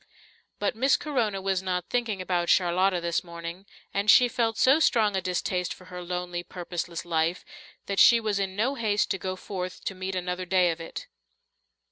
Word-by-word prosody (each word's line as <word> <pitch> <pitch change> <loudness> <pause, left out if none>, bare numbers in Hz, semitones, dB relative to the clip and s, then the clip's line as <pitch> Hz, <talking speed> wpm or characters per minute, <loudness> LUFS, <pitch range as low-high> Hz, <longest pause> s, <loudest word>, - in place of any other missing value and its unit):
But 205 - -1
Miss 265 +4 +3
Corona 225 -10 -1
was 190 -1 0
not 180 -2 -3
thinking 225 -6 -1
about 175 -2 -1
Charlotta 185 +1 +3
this 170 0 -1
morning, 170 +2 -8 0.3
and 200 +1 0
she 250 +4 +8
felt 230 -3 -1
so 270 +4 +5
strong 220 -9 +3
a 190 - 0
distaste 180 0 -2
for 185 - -16
her 180 - -5
lonely, 180 0 -4
purposeless 175 -1 -5
life 165 +1 0 0.4
that 200 -1 -2
she 235 - +8
was 215 -3 -1
in 190 -1 -2
no 235 +7 +1
haste 215 -5 0
to 190 - -1
go 185 0 -3
forth 185 -1 -6
to - - -2
meet 185 0 -5
another 180 0 -3
day 180 -1 +3
of 165 0 -6
it. 165 - -7
185 Hz, 185 wpm, -27 LUFS, 180-210 Hz, 0.4 s, she